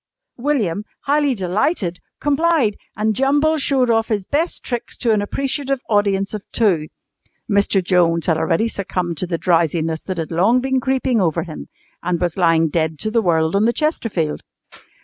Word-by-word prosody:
William, 235 Hz, -, 0 dB, 0.2 s
highly 285 Hz, -1 st, +2 dB
delighted, 190 Hz, -, -1 dB, 0.2 s
complied, 290 Hz, -6 st, +2 dB, 0.2 s
and 215 Hz, 0 st, +1 dB
Jumble 290 Hz, +5 st, +2 dB
showed 260 Hz, -3 st, +2 dB
off 225 Hz, 0 st, +2 dB
his 205 Hz, -4 st, -1 dB
best 315 Hz, -, -1 dB
tricks 240 Hz, -2 st, -4 dB
to 235 Hz, -, +1 dB
an 210 Hz, -2 st, +2 dB
appreciative 275 Hz, +4 st, -2 dB
audience 200 Hz, -2 st, +1 dB
of 210 Hz, -, -4 dB
two 180 Hz, -9 st, +1 dB, 0.6 s
(Mr. 200 Hz, -2 st, +2 dB
Jones 170 Hz, -2 st, +2 dB
had 165 Hz, -, +2 dB
already 165 Hz, +7 st, +1 dB
succumbed 180 Hz, -6 st, -3 dB
to 185 Hz, -, -2 dB
the 170 Hz, -1 st, -1 dB
drowsiness 165 Hz, -2 st, +1 dB
that 185 Hz, -2 st, -5 dB
had 165 Hz, 0 st, -4 dB
long 195 Hz, +9 st, +3 dB
been 265 Hz, +1 st, 0 dB
creeping 260 Hz, -3 st, +1 dB
over 165 Hz, -4 st, +1 dB
him 160 Hz, -4 st, -8 dB, 0.3 s
and 175 Hz, -1 st, -1 dB
was 175 Hz, -2 st, -1 dB
lying 165 Hz, -3 st, +3 dB
dead 160 Hz, 0 st, -1 dB
to 215 Hz, -, -2 dB
the 230 Hz, 0 st, +2 dB
world 160 Hz, -3 st, +1 dB
on 200 Hz, +2 st, +3 dB
the 235 Hz, -, +2 dB
chesterfield). 230 Hz, -, -1 dB
205 Hz, 170 wpm, -19 LUFS, 170-255 Hz, 0.6 s, long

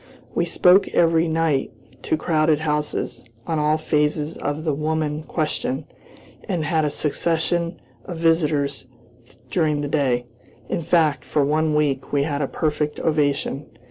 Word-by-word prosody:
We 170 Hz, -, +1 dB
spoke 180 Hz, +3 st, +5 dB
every 165 Hz, 0 st, +4 dB
night, 160 Hz, -4 st, +1 dB, 0.3 s
to 160 Hz, -, 0 dB
crowded 155 Hz, -1 st, +2 dB
houses, 150 Hz, -1 st, -2 dB, 0.2 s
on 160 Hz, -2 st, -1 dB
all 150 Hz, +1 st, +2 dB
phases 150 Hz, 0 st, 0 dB
of 145 Hz, +2 st, -3 dB
the 155 Hz, -3 st, 0 dB
woman 155 Hz, 0 st, -1 dB
question, 150 Hz, -3 st, -2 dB, 0.6 s
and 170 Hz, -5 st, -1 dB
had 160 Hz, +1 st, +1 dB
a 150 Hz, -, +1 dB
succession 170 Hz, +3 st, -1 dB, 0.3 s
of 175 Hz, -, -6 dB
visitors 150 Hz, -5 st, +1 dB, 0.6 s
during 155 Hz, -4 st, +1 dB
the 145 Hz, -, -2 dB
day. 130 Hz, -4 st, +1 dB, 0.4 s
In 180 Hz, -, -1 dB
fact, 155 Hz, -5 st, +2 dB
for 145 Hz, -2 st, +1 dB
one 155 Hz, +1 st, +1 dB
week, 140 Hz, -3 st, 0 dB
we 140 Hz, -1 st, +2 dB
had 145 Hz, -1 st, -2 dB
a 140 Hz, -, 0 dB
perfect 150 Hz, -1 st, -1 dB
ovation. 145 Hz, -2 st, 0 dB
155 Hz, 140 wpm, -22 LUFS, 145-160 Hz, 0.6 s, spoke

